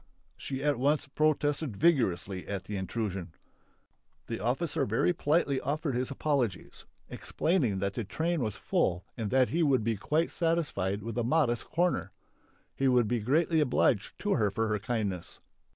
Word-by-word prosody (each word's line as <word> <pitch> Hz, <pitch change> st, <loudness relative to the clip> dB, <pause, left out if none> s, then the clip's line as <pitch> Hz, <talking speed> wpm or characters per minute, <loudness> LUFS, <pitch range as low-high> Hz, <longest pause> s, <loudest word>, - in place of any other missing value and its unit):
She 135 Hz, 0 st, -5 dB
at 145 Hz, -4 st, +1 dB
once 145 Hz, +2 st, +1 dB
protested 145 Hz, -4 st, 0 dB
vigorously 100 Hz, -, +1 dB
at 100 Hz, -2 st, -3 dB
the 105 Hz, -, -6 dB
intrusion. 95 Hz, -3 st, -3 dB, 0.9 s
The -, -, -4 dB
officer 135 Hz, -, 0 dB
very 115 Hz, +11 st, +2 dB
politely 145 Hz, -4 st, +1 dB
offered 150 Hz, 0 st, -2 dB
his 125 Hz, +1 st, -1 dB
apologies, 135 Hz, -, -2 dB, 0.2 s
explaining 140 Hz, -, 0 dB
that 100 Hz, +1 st, -1 dB
the 120 Hz, -, -3 dB
train 160 Hz, -, -1 dB
was 110 Hz, -4 st, -2 dB
full 90 Hz, +1 st, 0 dB
and 110 Hz, -4 st, -3 dB
that 130 Hz, +1 st, +3 dB
he 170 Hz, -, 0 dB
would 135 Hz, -7 st, +3 dB
be 115 Hz, -1 st, 0 dB
quite 155 Hz, -, 0 dB
satisfied 150 Hz, -, -1 dB
with 115 Hz, +2 st, -3 dB
a -, -, +1 dB
modest 120 Hz, -3 st, +1 dB
corner. 170 Hz, -, 0 dB, 0.6 s
He 135 Hz, -, +1 dB
would 125 Hz, -3 st, +4 dB
be 120 Hz, +2 st, 0 dB
greatly 155 Hz, +8 st, +2 dB
obliged 125 Hz, -7 st, +1 dB
to 205 Hz, -, -1 dB
her 105 Hz, -3 st, +2 dB
for 110 Hz, +3 st, -1 dB
her 105 Hz, 0 st, 0 dB
kindness. 105 Hz, -5 st, -3 dB
125 Hz, 160 wpm, -30 LUFS, 105-150 Hz, 0.9 s, would